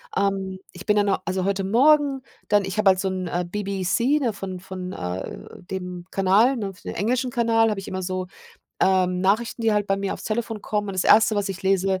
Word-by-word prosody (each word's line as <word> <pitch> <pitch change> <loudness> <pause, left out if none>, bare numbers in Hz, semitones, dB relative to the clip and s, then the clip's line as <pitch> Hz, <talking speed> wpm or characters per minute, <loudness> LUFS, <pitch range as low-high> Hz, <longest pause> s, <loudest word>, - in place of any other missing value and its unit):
ähm, 195 -1 -1
ich 180 +1 -11
bin 210 -1 +3
dann 205 -1 +2 0.2
also, 185 0 -1
heute 195 0 0
Morgen 275 +5 +4 0.3
dann 205 -1 +3
ich 195 +2 -5
habe 210 -2 +5
halt 185 - -1
so 190 - 0
'n, 185 -1 -3
äh, 175 +1 -1
BBC, 200 +8 0
ne? 245 -5 0
Von 190 -2 -6
von, 185 0 -7
äh, 90 -9 -5 0.2
dem 180 -1 -6
Kanal, 200 +7 +3
ne 200 -4 -4
für - - -20
den - - -6
englischen 250 +4 0
Kanal 225 -1 +3
habe 210 -2 -2
ich 195 - -9
immer 185 0 -3
so, 185 0 -3 0.5
ähm, 185 -1 +2
Nachrichten, 220 +5 0
die 225 -1 +3
halt 205 -1 +1
bei 195 - +1
mir 195 0 -2
aufs - - -8
Telefon 220 -1 -3
kommen. 210 -1 -2
Und 195 - -4
das 185 - 0
1. 220 0 +6
was 200 -1 0
ich 195 0 -6
lese: 190 0 +1
195 Hz, 225 wpm, -23 LUFS, 185-220 Hz, 0.5 s, 1